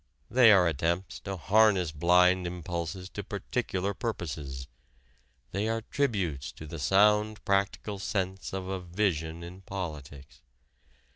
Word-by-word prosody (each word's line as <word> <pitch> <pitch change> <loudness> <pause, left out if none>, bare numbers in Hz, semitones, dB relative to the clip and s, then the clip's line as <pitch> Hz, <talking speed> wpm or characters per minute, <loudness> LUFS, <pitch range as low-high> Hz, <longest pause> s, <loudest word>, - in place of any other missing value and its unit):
They 120 -2 +7
are 95 -4 +6
attempts 85 +4 -1
to 95 0 -5
harness 100 -2 +3
blind 90 +3 +4
impulses 85 +1 -4
to 100 - -6
particular 100 -1 -2
purposes. 80 - -5 0.8
They 100 +4 -1
are 115 0 -1
tributes 95 - -1
to 80 - -10
the 80 +1 -7
sound 105 +6 +3
practical 100 +1 0
sense 95 -1 -2
of 95 -1 -4
a 95 0 -2
vision 85 -3 -1
in 90 +2 -10
politics. 75 -8 -7
95 Hz, 125 wpm, -29 LUFS, 85-100 Hz, 0.8 s, They